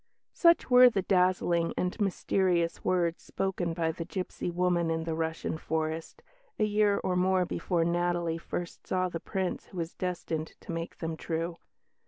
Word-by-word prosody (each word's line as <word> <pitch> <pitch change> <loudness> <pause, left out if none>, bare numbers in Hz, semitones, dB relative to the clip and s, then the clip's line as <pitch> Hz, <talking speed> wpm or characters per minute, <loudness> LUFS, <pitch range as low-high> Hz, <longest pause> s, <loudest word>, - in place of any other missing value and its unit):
Such 340 -1 +4
were 250 0 +9
the 195 -5 -1
dazzling 180 -3 +2
and 180 +4 -1
mysterious 180 -3 +1
words 175 -2 +1
spoken 180 -3 -2
by 165 -1 +1
the 165 - -5
gipsy 180 +1 -4
woman 175 -1 +1
in 160 0 -1
the 165 0 -2
Russian 160 0 -2
forest, 160 - -3 0.3
a - - +1
year 210 -1 +3
or 185 - 0
more 185 0 +3
before 170 -1 0
Natalie 175 -1 0
first 175 +1 -6
saw 185 0 +1
the 170 - -4
Prince 190 0 -3
who 185 - -11
was 165 0 -3
destined 165 -3 -3
to - - -7
make 165 0 -4
them 160 -1 -3
true. 165 +1 -3
175 Hz, 165 wpm, -29 LUFS, 165-185 Hz, 0.3 s, were